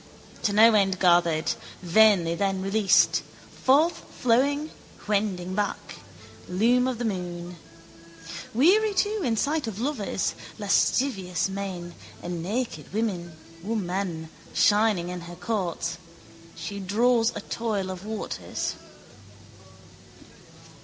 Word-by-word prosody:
To 210 - +1
no 220 +2 +7
end 195 -3 +3
gathered; 170 -3 +3 0.3
vainly 180 -2 +5
then 195 +2 0
released, 195 0 +3 0.4
forthflowing, 285 -1 +2 0.4
wending 195 -3 -1
back: 205 0 -3 0.5
loom 235 +7 +3
of 255 -2 -2
the 240 - -3
moon. 175 -3 -4 0.9
Weary 395 - +4
too 415 +2 +1
in 230 -4 0
sight 295 +2 0
of 215 -2 -5
lovers, 240 -7 -1 0.2
lascivious 200 -2 +1
men, 190 -3 -5 0.3
a 175 - -5
naked 180 - -3
woman 180 -2 -3 0.3
shining 205 -4 +3
in 180 -1 -5
her 170 +1 -9
courts, 175 -3 -3 0.6
she 200 -1 -6
draws 225 +4 +2
a - - -4
toil 210 -5 -2
of 185 0 -8
waters. 215 0 -4
200 Hz, 100 wpm, -26 LUFS, 180-230 Hz, 0.9 s, no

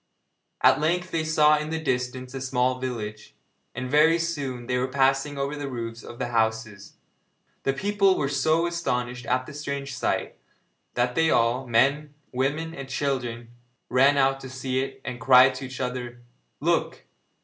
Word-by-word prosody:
At - - +5
length 180 +4 0
they 160 -1 0
saw 155 -1 +4
in 150 0 -4
the 160 0 -2
distance 125 -3 -2
a 135 - -5
small 130 0 0
village, 110 -4 -6 0.4
and 125 +1 -4
very 155 +5 +5
soon 140 -7 -3
they 125 +1 0
were 130 - 0
passing 135 +2 +1
over 140 +1 -2
the 145 -1 -5
roofs 115 -2 -5
of 120 - -10
the 120 - -3
houses. 110 -3 -1 0.7
The 135 - +2
people 195 +4 +2
were 140 - 0
so 155 +4 +2
astonished 125 -8 -2
at 130 +1 +1
the 150 - -10
strange 140 -2 -4
sight, 125 - -2 0.6
that 125 0 +1
they 160 +4 +2
all 120 +1 +2
men, 140 +5 +2 0.2
women 145 +6 -1
and 135 -4 -8
children 120 -5 -2 0.4
ran 135 +3 +4
out 135 0 +3
to 130 - -9
see 130 0 -2
it, 135 - -6
and 125 -1 -5
cried 130 -1 +7
to 130 +1 -6
each 130 0 -9
other: 125 -1 -4 0.4
'Look! - - 0
130 Hz, 170 wpm, -25 LUFS, 125-150 Hz, 0.7 s, cried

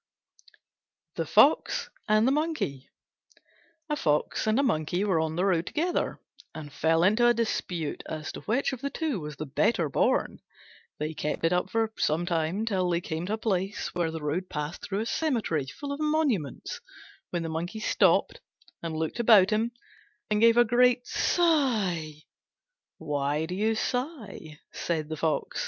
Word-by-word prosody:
THE - - -2
FOX - - +3 0.2
AND 215 +2 +4
THE - - +4
MONKEY 295 - -2 1.0
A 300 - -1
Fox 150 - 0
and 215 +4 +3
a - - +3
Monkey 175 - 0
were 190 -6 +2
on 160 0 -1
the 180 +3 +1
road 175 -3 +1
together, 345 +4 -1 0.4
and 150 -3 -8
fell 165 +1 +2
into 215 +6 +4
a 240 - +4
dispute 180 -8 -2
as 155 -1 -5
to - - -9
which 250 +5 0
of 255 - -6
the 280 - -2
two 295 - -2
was 150 -2 -7
the 155 - -5
better 155 - +1
born. - - +1 0.6
They 155 +1 -3
kept 150 +1 -2
it 165 - +3
up 180 - 0
for 225 -1 0
some 160 +3 +1
time, 170 +5 -1
till 190 -5 0
they 170 -1 +1
came 165 0 -4
to 210 - -1
a - - 0
place 195 -2 -2
where 175 -2 0
the 160 -1 -6
road 170 +5 -2
passed 150 +2 -4
through 200 +1 -3
a - - -2
cemetery 230 - -1
full 280 - -7
of 280 - -4
monuments, 300 - -1 0.5
when 175 -2 -2
the 165 - -4
Monkey 170 +7 -4
stopped - - +2 0.4
and 165 -1 -4
looked 160 +8 -3
about 215 -4 +6
him 220 +2 +1 0.6
and 210 0 +2
gave 230 0 +6
a 240 - +7
great 245 +1 +3
sigh. 210 - +1 0.7
"Why 145 +1 -1
do 180 - -5
you 215 +4 +1
sigh?" 225 - -4
said 155 -3 -2
the 155 - -4
Fox. 160 +1 -1
185 Hz, 170 wpm, -27 LUFS, 160-235 Hz, 1.0 s, a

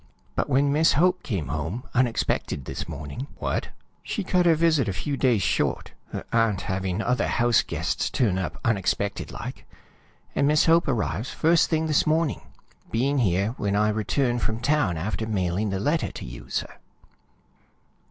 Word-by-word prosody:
But - - -1
when 140 +2 +3
Miss 160 +2 +4
Hope 180 +4 +3
came 90 - -3
home 80 - -3
unexpected 120 - 0
this - - -5
morning 75 - -6
" - - -21
"What?" - - -2 0.3
"She 210 - -3
cut 180 -1 +2
her 165 - +6
visit 155 -7 +2
a - - -1
few 140 +10 -3
days 125 -7 +2
short, - - 0 0.2
her - - -4
aunt 115 -4 +2
having 95 +2 -2
other 125 +1 +1
house 120 -1 +3
guests - - -2
turn 100 -8 +1
up 95 - -4
unexpected 100 -2 0
like, - - -7 0.7
and 140 - +2
Miss 150 +1 +4
Hope 165 +1 +4
arrives 115 - -1
first 165 +1 +3
thing 160 -1 +1
this 155 0 +2
morning, 160 -1 +1 0.5
being 135 +5 +1
here 100 -2 +2
when 100 0 0
I 105 +1 +3
return 120 +4 0
from 110 -1 -2
town 125 - +1
after 110 +6 -3
mailing 100 0 0
the 95 -1 -2
letter 150 +10 0
to - - -7
you, - - -10
sir. - - -3
115 Hz, 170 wpm, -25 LUFS, 95-145 Hz, 0.7 s, her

